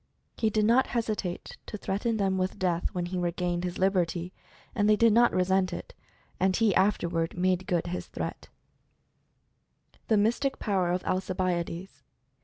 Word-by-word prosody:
He 220 - +1
did 215 0 +1
not 240 +4 +4
hesitate 215 -6 -3
to 210 - -5
threaten 215 +4 -1
them 190 -2 +1
with 185 0 -1
death 175 -2 0
when 175 -1 -2
he 180 +1 -3
regained 175 0 -1
his 180 0 -3
liberty, 180 -2 0 0.4
and 205 -1 +2
they 215 - +6
did 230 0 +4
not 240 +2 +5
resent 185 0 +2
it - - -7 0.2
— - - -35
and 190 0 +2
he 225 -4 +3
afterward 170 -4 +1
made 185 0 +1
good 175 -4 0
his 175 +1 -4
threats. - - -5 1.6
THE 220 - +3
MYSTIC 240 +6 +1
POWER 190 -5 0
OF 180 +1 -1
ALCIBIADES. 185 -1 -2
185 Hz, 160 wpm, -28 LUFS, 180-210 Hz, 1.6 s, they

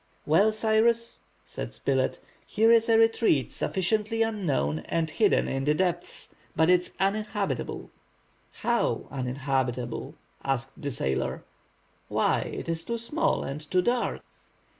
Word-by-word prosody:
"Well, 195 +8 +4
Cyrus," 225 +2 +1 0.3
said - - -6
Spilett, 130 -1 0 0.3
"here 225 +2 +3
is 230 0 +4
a 225 - +6
retreat 225 - +3
sufficiently 215 +4 0
unknown 150 - -1
and 165 -1 0
hidden 210 +3 +2
in 135 0 -2
the 150 +2 +2
depths, 175 0 -2 0.3
but 160 +2 +4
it 180 -1 +5
is - - -8
uninhabitable." 200 - -2 0.6
"How, - - 0
uninhabitable?" 130 -2 -2 0.3
asked 135 -1 -3
the 145 - -2
sailor. 65 - -2 0.6
"Why, - - +2
it - - -5
is 165 0 -2
too 235 +6 -3
small 295 +9 0
and 140 +3 -5
too 180 -1 +2
dark." 240 +2 0
180 Hz, 130 wpm, -27 LUFS, 135-220 Hz, 0.6 s, a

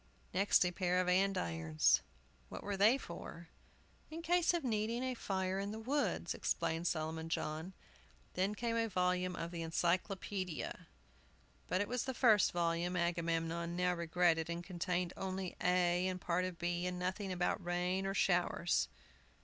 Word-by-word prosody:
Next, 190 0 +4
a 180 - +1
pair 180 0 +1
of 185 - +1
andirons. 85 - +2 0.5
"What - - -7
were 205 0 -2
they 210 +7 +5
for?" 170 -6 -9 0.6
"In 325 +2 -7
case 350 0 +3
of 345 -3 -1
needing 230 0 0
a 260 0 -1
fire 190 -4 -2
in 200 +1 -3
the 215 - -5
woods," 270 +6 -1
explained 165 +2 -1
Solomon 160 0 -2
John. 160 +3 -3 0.6
Then 195 +3 0
came 230 +1 -1
a 230 0 +1
volume 180 -1 +1
of 165 +1 -4
the 170 -1 -4
Encyclopædia. 180 +2 -2 0.8
But 185 - +1
it 205 - -1
was 250 0 -1
the 260 -1 -3
first 220 -6 +5
volume, 170 +1 0
Agamemnon 170 -1 -1
now 180 0 +2
regretted, 170 -1 +2
and 170 +1 -3
contained 180 0 -2
only 190 -1 -4
A 180 0 +3
and 185 -1 -2
a - - -20
part 180 +1 +1
of 185 -2 -5
B, 175 +1 -1
and 180 0 -3
nothing 185 +2 -2
about 180 +2 0
rain 180 +2 0
or 195 - -2
showers. 175 -2 +2
180 Hz, 160 wpm, -36 LUFS, 170-195 Hz, 0.8 s, they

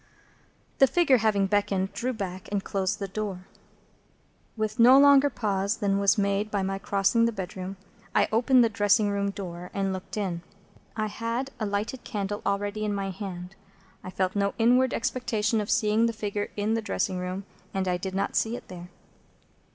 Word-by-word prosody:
The 270 - +7
figure, 295 -4 +4
having 205 -3 +2
beckoned, 195 -1 0
drew 250 +2 -2
back, 190 -5 -6
and 200 -1 -1
closed 195 +1 -1
the 200 -2 -4
door. 195 -2 -5 1.1
With 215 +1 -2
no 250 +3 +8
longer 280 0 +7
pause 200 -3 -1
than 200 -2 +1
was 200 +2 +3
made 200 +1 0
by 200 -2 -1
my 195 0 -2
crossing 200 +3 +2
the 230 - +1
bedroom, 190 -1 -6 0.4
I - - +4
opened 245 +3 +4
the 230 - +3
dressing 205 0 +2
room 200 0 0
door, 180 -3 -7
and 195 -1 0
looked 185 +3 -7
in. 185 -5 -2 0.5
I 215 -1 -1
had 230 +5 -3
a 215 - -1
lighted 205 +5 -3
candle 205 -2 -3
already 205 +2 -1
in 210 -1 -1
my 195 -1 -2
hand. 185 -2 -7 0.5
I - - -6
felt 185 +1 -1
no 200 0 0
inward 245 +2 +4
expectation 225 -2 0
of 210 - -5
seeing 220 0 +3
the 230 - -2
figure 205 -1 -3
in 210 +2 0
the 225 - 0
dressing 195 -3 -2
room, 185 +2 -4 0.3
and 190 -1 -2
I 180 -1 +1
did 190 +1 -5
not 195 +1 -1
see 225 +1 +1
it - - -10
there. 180 -1 -9
205 Hz, 180 wpm, -27 LUFS, 195-225 Hz, 1.1 s, no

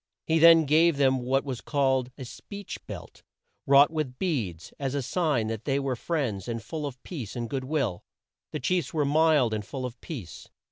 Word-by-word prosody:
He 160 0 +2
then 165 0 +8
gave 160 +2 +4
them 135 -2 +3
what 135 +2 0
was 130 -4 -4
called 135 -3 +1
a 130 - -7
"speech 200 - -8
belt," - - -9 0.5
wrought 140 +2 +7
with 150 -6 -3
beads, 115 - -3
as 135 -1 -2
a 140 - -1
sign 150 -6 0
that 110 0 -4
they 135 -1 +1
were 135 -2 -1
friends 125 - -2
and 115 -1 -2
full 145 +7 -5
of 130 -2 -8
peace 130 - -6
and 120 -1 -3
good 130 +1 -3
will. 130 - -1 0.5
The - - -3
chiefs 165 +1 -1
were 150 -2 +2
mild 150 -5 +3
and 105 -1 -2
full 130 +5 -5
of 120 -1 -8
peace. 115 - -8
135 Hz, 195 wpm, -27 LUFS, 120-155 Hz, 0.5 s, then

